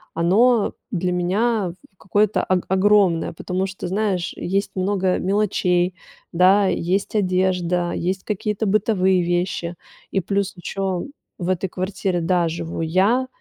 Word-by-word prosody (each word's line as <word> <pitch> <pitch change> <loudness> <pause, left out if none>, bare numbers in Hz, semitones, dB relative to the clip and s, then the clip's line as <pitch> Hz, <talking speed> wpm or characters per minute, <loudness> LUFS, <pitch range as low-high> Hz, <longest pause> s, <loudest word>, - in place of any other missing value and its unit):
оно 210 +8 +3 0.2
для 180 -3 -1
меня, 190 +2 0 0.2
в - - -40
какое-то 205 +3 +1
ог 185 -1 +1
огромное, 190 -3 +3
потому 185 +3 -3
что, 190 -2 -6
знаешь, 190 -2 -1
есть 195 +3 -2
много 190 -1 +1
мелочей, 185 -2 +1 0.4
да, 185 +4 +5
есть 185 +3 -1
одежда, 180 -3 +1
есть 185 +2 -2
какие-то 210 +1 -2
бытовые 190 -3 +2
вещи. 175 0 -1 0.4
И 195 - +1
плюс 200 +2 -1
еще 185 0 -3 0.3
в 175 - -4
этой 185 0 -1
квартире, 185 -1 -2
да, 175 0 +2
живу 165 0 -5
я, 195 +11 +2
185 Hz, 130 wpm, -21 LUFS, 175-200 Hz, 0.4 s, да